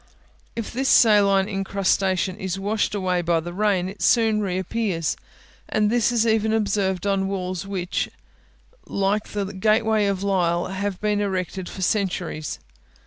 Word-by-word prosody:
If 230 -2 -5
this 265 +2 0
saline 200 -4 +5
incrustation 195 -2 0
is 190 -2 -3
washed 205 +2 -1
away 185 -3 0
by 170 -1 +1
the 175 +2 -6
rain, 195 -2 +1
it 195 +2 -9
soon 220 -3 +3
re 185 -3 -1
appears; 190 -4 -1 0.5
and 210 0 +1
this 240 -1 +2
is 230 -2 +2
even 220 -1 +2
observed 200 -3 0
on 195 -1 +1
walls 185 -1 -3
which, 185 -2 -2 0.8
like 200 +2 0
the 205 -1 -3
gateway 215 +1 +2
of 200 -1 -1
Lisle, 175 -3 +1
have 195 0 -3
been 210 -1 +1
erected 190 -2 -3
for 190 - -6
centuries. 180 -5 -1
195 Hz, 145 wpm, -23 LUFS, 185-210 Hz, 0.8 s, saline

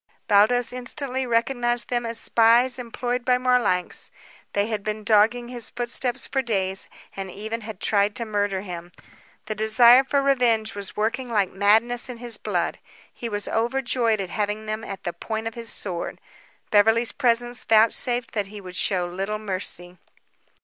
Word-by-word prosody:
Baldos 225 +4 +4
instantly 255 +1 -4
recognized 240 0 +1
them 240 -1 -1
as 230 0 -2
spies 240 +3 +4
employed 245 +1 -3
by 250 0 +3
Marlanx. 250 -8 +1 0.4
They 200 0 +1
had 215 -2 -3
been 215 0 -3
dogging 225 +3 +3
his 245 -2 -3
footsteps 245 +1 -1
for 270 - 0
days 195 -5 -2 0.3
and 195 -1 -5
even 220 +5 -5
had 215 -3 -8
tried 205 0 +1
to 235 -2 -3
murder 205 -3 -1
him, 175 -2 -8 0.5
The 215 - -3
desire 235 +4 +6
for 275 +1 0
vengeance 225 -4 +1
was 200 -1 -5
working 230 +4 -1
like 205 -5 +1
madness 225 +6 +2
in 245 - -6
his 235 -2 -2
blood. - - -2 0.3
He 235 - -5
was 205 -1 -3
overjoyed 235 -1 0
at 190 -3 -4
having 210 0 -2
them 215 +1 -4
at 195 -3 -7
the 175 - -3
point 220 +5 -4
of 225 - -4
his 235 -2 -7
sword. 175 -4 -5 0.5
Beverly's 225 +2 +4
presence 240 -2 0
vouchsafed 230 +2 +2
that 205 -3 -2
he 210 +1 -9
would 185 -2 -10
show 185 -2 +1
little 195 +4 -3
mercy. 185 -3 -4
225 Hz, 165 wpm, -24 LUFS, 205-240 Hz, 0.5 s, desire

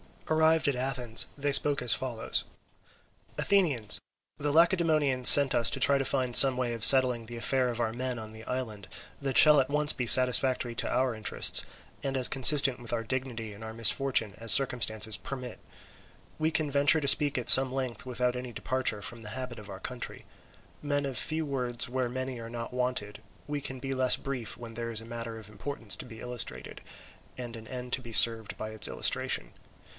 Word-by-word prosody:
Arrived 160 0 +1
at 140 - -2
Athens 125 -3 -2
they 145 0 -2
spoke 145 0 +2
as 125 - +2
follows: 120 -4 -4 0.9
"Athenians, 150 - 0 0.4
the 145 0 -3
Lacedaemonians 155 -6 +2
sent 140 -2 +7
us 120 -2 +1
to 135 - -3
try 140 +2 +2
to 135 - -3
find 130 -3 -2
some 135 -2 +7
way 125 -2 -3
of 115 -2 -5
settling 125 -3 +8
the 120 +1 -10
affair 130 +2 -1
of 120 -1 -5
our 115 -1 -2
men 125 +1 -5
on 110 -1 -10
the 110 0 -13
island, 110 -7 -7 0.3
that 135 -2 -2
shall 150 0 +6
be - - +4
at 130 - -6
once 150 +1 +1
satisfactory 125 0 +3
to - - -3
our 130 -1 -1
interests, 110 -1 -1 0.4
and 135 -1 -5
as 130 -2 +1
consistent 135 -1 +5
with 120 -1 -9
our 115 -1 -3
dignity 120 -3 -6
in 100 - -15
our 110 0 -9
misfortune 115 -1 -1
as 115 0 +6
circumstances 110 -5 -1
permit. 125 -4 -9 0.8
We 155 0 0
can 155 -2 -2
venture 145 +3 +2
to 140 - +2
speak 145 -1 +3
at 125 - -1
some 130 -1 +10
length 130 -3 -6
without 125 0 -3
any 125 -1 -8
departure 130 -2 -3
from 115 +4 -7
the 105 - -8
habit 125 -3 -8
of 105 -1 -14
our - - -11
country. - - -8 0.6
Men 145 -1 -3
of 135 -2 -6
few 160 0 -3
words 125 -4 -4
where 130 -1 -3
many 130 0 -6
are 115 0 -10
not 115 +1 -8
wanted, 125 -5 -4 0.3
we 145 0 -4
can 130 -2 -8
be 135 +1 -5
less 130 -1 +2
brief 130 -5 -7
when 115 -1 -11
there 115 0 -6
is 115 -1 -4
a - - -13
matter 115 -1 -8
of 110 -2 -14
importance 115 +1 -4
to - - -9
be 110 -3 -13
illustrated 125 -1 -5 0.6
and 120 -2 -9
an 110 -1 -13
end 125 0 -9
to 130 - -1
be 120 -2 -12
served 115 -2 +3
by 110 - -7
its 110 0 +2
illustration. - - -1
125 Hz, 200 wpm, -27 LUFS, 115-135 Hz, 0.9 s, some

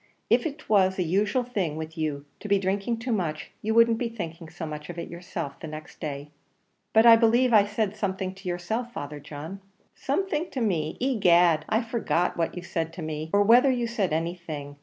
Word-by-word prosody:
If - - +4
it 310 0 -9
was 190 -3 +3
a 185 - +1
usual 205 +9 +1
thing 195 -11 -2
with 160 0 -6
you 150 -3 -3
to - - -7
be 200 -1 +4
drinking 195 +4 -1
too 235 +2 -4
much, 165 -8 -2
you 220 +1 -1
wouldn't 230 -1 +5
be 240 - -1
thinking 170 -7 -7
so 165 +1 -6
much 150 0 -7
of 175 - -7
it 170 - -5
yourself 170 -4 -6
the - - -7
next 155 0 -9
day." 145 -2 -5 0.6
"But 220 +1 +5
I 230 -1 +10
believe 235 +2 +3
I 205 -2 +7
said 210 -1 -1
something 190 -2 -2
to 190 -1 -7
yourself, 220 +8 -3
Father 145 -4 -6
John." 155 +7 -8 0.3
"Something 325 +2 -1
to 265 - -4
me! 165 -9 -1
Egad, 175 -10 +4
I 220 +3 +2
forget 225 -6 0
what 165 +1 -2
you 175 - -5
said 165 -3 -3
to 170 -1 -7
me, 155 0 -4
or 205 0 +4
whether 245 +6 +6
you 245 -2 +1
said 215 -6 -1
anything. 160 -3 -4
185 Hz, 205 wpm, -26 LUFS, 160-225 Hz, 0.6 s, I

